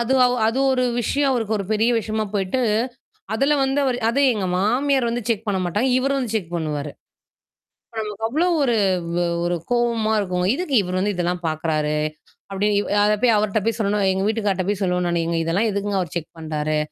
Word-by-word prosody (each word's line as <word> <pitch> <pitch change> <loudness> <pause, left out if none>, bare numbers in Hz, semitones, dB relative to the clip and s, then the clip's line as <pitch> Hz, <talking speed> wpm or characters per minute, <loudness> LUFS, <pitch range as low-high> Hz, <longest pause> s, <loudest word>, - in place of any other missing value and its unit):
அது 235 +3 +1 0.3
அது 230 +4 0
ஒரு 255 -1 +1 0.2
விஷயம் 275 +4 +1
அவருக்கு 225 -4 -1
ஒரு 200 - -3
பெரிய 220 +2 +2
விஷயமா 220 0 -2
போயிட்டு, 195 +5 0 0.7
அதுல 275 +6 +2
வந்து 270 +1 0
அவரு 250 -2 0
அதும் 275 +4 +3
எங்க 205 -5 -2
மாமியார் 250 +5 +1
வந்து 240 +1 -2
செக் 225 -1 -1
பண்ண 200 -2 0
மாட்டாங்க. 205 +9 0
இவரு 275 +2 0
வந்து 240 -4 -3
செக் 180 -6 -2
பண்ணுவாரு. 150 -3 -3 1.1
நமக்கு 210 0 -5
அவ்ளோ 310 +9 +1 0.2
ஒரு-ஒரு 175 -6 0
கோவமா 235 -2 +1
இருக்கும். 180 -2 -1
"எதுக்கு 325 -2 -3
இவரு 180 0 -3
வந்து 205 +2 0
இதெல்லாம் 180 0 -2
பார்க்கிறாரு." 155 -1 -1 0.5
அப்படினு 200 +2 0 0.3
அத 210 - +3
போய் 240 -3 +5
அவர்ட்ட 210 0 +1
போய் 225 -2 +1
சொல்லுவேன் 200 -2 +1
எங்க 190 0 -1
வீட்டுக்காரர்கிட்ட 205 -4 0
போய் 205 -1 -2
சொல்லுவேன் 180 -1 0
நானு. 170 -1 0
"ஏங்க 170 0 -1
இதெல்லாம் 185 +8 +1
எதுக்குங்க 200 0 -1
அவர் 175 -4 -5
செக் 165 -2 -3
பண்றாரு. 155 -1 -2
205 Hz, 175 wpm, -22 LUFS, 180-235 Hz, 1.1 s, போய்